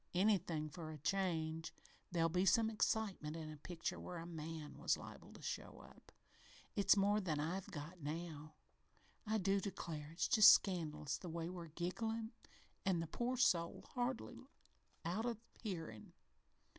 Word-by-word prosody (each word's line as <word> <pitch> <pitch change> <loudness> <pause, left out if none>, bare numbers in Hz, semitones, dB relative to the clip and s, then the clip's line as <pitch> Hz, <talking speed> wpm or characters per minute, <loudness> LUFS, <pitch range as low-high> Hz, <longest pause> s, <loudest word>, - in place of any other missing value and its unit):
Anything 180 -5 +2
for 160 0 -7
a 155 - -6
change. 160 -1 0 0.4
There'd 165 -2 +2
be 180 +1 +3
some 220 +4 +4
excitement 205 -8 0
in 155 -1 -5
a 155 - -8
picture 165 +3 -4
where 180 - -6
a 165 - -5
man 160 -2 -6
was - - +2
liable - - -10
to - - -12
show - - -4
up. - - -16 0.6
It's 200 0 +5
more 205 +2 +4
than 160 -6 -1
I've 180 +5 -2
got 160 +3 -7
now. 155 0 -5 0.7
I 220 +1 +2
do 195 0 +2
declare 165 -6 -4
it's 165 - 0
just 215 -2 +10
scandalous 155 -6 +1
the 180 - -6
way 165 +1 -3
we're 175 -2 -6
gigglin', 220 +8 -2 0.5
an' 190 -3 +2
the 165 - -1
poor 240 +10 -1
soul 175 -10 +2
hardly 250 +1 -3 0.6
out 200 +8 0
o' 235 -2 -1 0.2
hearin'. 165 - -5
175 Hz, 155 wpm, -40 LUFS, 160-200 Hz, 0.7 s, just